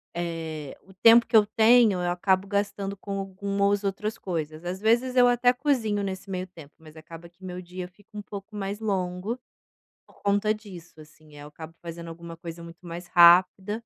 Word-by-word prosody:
eh, 160 -4 -5
o 190 - -19
tempo 230 +4 +6
que - - -1
eu 210 - +6
tenho, 220 -3 +4
eu 175 - -1
acabo 190 +2 +1
gastando 200 0 -2
com 195 0 -5
algumas 200 +1 -1
outras 210 +2 -3
coisas. 160 -2 -5
Às 185 +2 -4
vezes, 240 +4 +2
eu 245 -1 +6
até 245 0 +3
cozinho 245 -7 0
nesse 190 0 -5
meio 185 -1 -4
tempo, 160 -5 -15
mas 155 0 -16
acaba 165 +2 -12
que 180 +2 -24
meu 180 0 -6
dia 180 0 -7
fica 200 +3 -25
um - - -4
pouco 200 +1 -10
mais 200 +1 -4
longo 195 +1 -2 0.7
por - - -23
conta 205 +1 +2
disso, 180 -7 -12
assim. 155 0 -18
Aí, 145 - -11
eu - - -10
acabo 160 +2 -11
fazendo 170 0 -8
alguma 165 0 -10
coisa 170 0 -9
muito 170 +1 -13
mais 175 +1 -7
rápida 180 +3 +6
190 Hz, 190 wpm, -26 LUFS, 170-205 Hz, 0.7 s, tempo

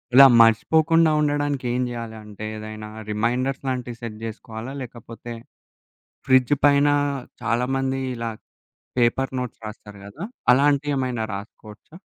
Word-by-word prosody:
ఇలా 135 0 +11
మర్షిపోకుండా 160 +8 +4
ఉండడానికి 145 -3 0
ఏం 125 - 0
జేయాలంటే, 110 -3 -7
ఏదైనా 110 0 -7 0.2
రిమైండర్స్ 125 +6 -1
లాంటివి 125 -2 -4
సెట్ 110 -2 -6
జేసుకోవాలా? 115 +3 -7
లేకపోతే 120 0 -9 1.0
ఫ్రిడ్జ్ 130 +1 +5
పైన 145 0 +5 0.6
చాలా 115 +2 +1
మంది 135 0 -1 0.2
ఇలా 115 -1 -3 0.7
పేపర్ 130 +3 +1
నోట్స్ 125 -2 -5
రాస్తారు 105 -1 -11
కదా! 155 - -9 0.3
అలాంటియేమైనా 135 -4 +1
రాసుకోవచ్చా? 105 +7 -11
120 Hz, 110 wpm, -23 LUFS, 110-135 Hz, 1.0 s, ఇలా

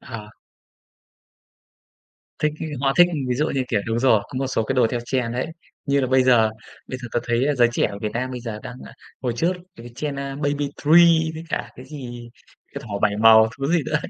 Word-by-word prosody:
Ờ. 110 -3 -9 2.1
Thích 150 0 +2
ấy 160 - -3
họ 135 -1 +2
thích, 175 - +8 0.2
ví 125 - +1
dụ 150 +5 0
như, 135 - +1
kiểu 105 - +1
đúng 115 +1 -1
rồi, 120 -4 +4
có 130 - -5
một 135 - -1
số 130 -3 0
cái 135 - -2
đồ 125 -3 +4
theo 120 - -2
trend 120 -2 -1
đấy, 125 +2 -2 0.4
như 140 0 +2
là 130 - 0
bây 130 +1 +3
giờ 120 -4 +4 0.4
bây 130 - -5
giờ 125 -1 -8
tớ 120 - +1
thấy 120 +2 +1
giới 120 -1 +5
trẻ - - +2
ở 100 - -7
Việt 105 0 -4
Nam 130 +2 -2
bây 125 -1 -6
giờ 115 -3 -6
đang, 125 - -8
ơ, - - -12 0.3
hồi 125 -2 -1
trước 170 +9 +1 0.2
cái 120 +1 -11
trend 145 +2 -4
Baby 140 +1 -2 0.2
Three 165 +1 +6
với 160 +1 -7
cả - - -3
cái 130 - -10
gì 120 -5 -9 0.4
cái 140 - -6
thỏ 100 -2 -4
bảy 105 -1 +2
màu, 110 0 +7
thứ 135 - -2
gì 170 -3 +3
nữa - - +1
130 Hz, 225 wpm, -22 LUFS, 120-140 Hz, 2.1 s, thích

